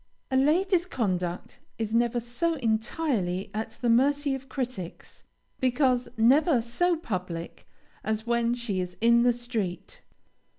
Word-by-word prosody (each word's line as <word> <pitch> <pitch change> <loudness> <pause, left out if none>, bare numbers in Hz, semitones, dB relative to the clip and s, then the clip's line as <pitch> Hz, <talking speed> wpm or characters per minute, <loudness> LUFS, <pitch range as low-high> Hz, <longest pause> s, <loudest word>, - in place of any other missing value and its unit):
A - - +1
lady's 345 +6 +3
conduct 180 - -2 0.2
is 220 -1 -3
never 240 +1 +2
so 285 +9 -1
entirely 220 - -1
at 215 +1 -4
the - - +2
mercy 280 +4 +3
of 270 0 -6
critics, 245 - -6 0.3
because 255 -1 +2
never 265 +5 +4
so 330 +10 +1
public, 180 - -5 0.4
as 220 +1 -2
when 235 0 +1
she 235 -6 -2
is 180 0 -4
in 235 +1 +5
the 245 0 +5
street. 230 -7 -4
235 Hz, 130 wpm, -27 LUFS, 215-270 Hz, 0.4 s, in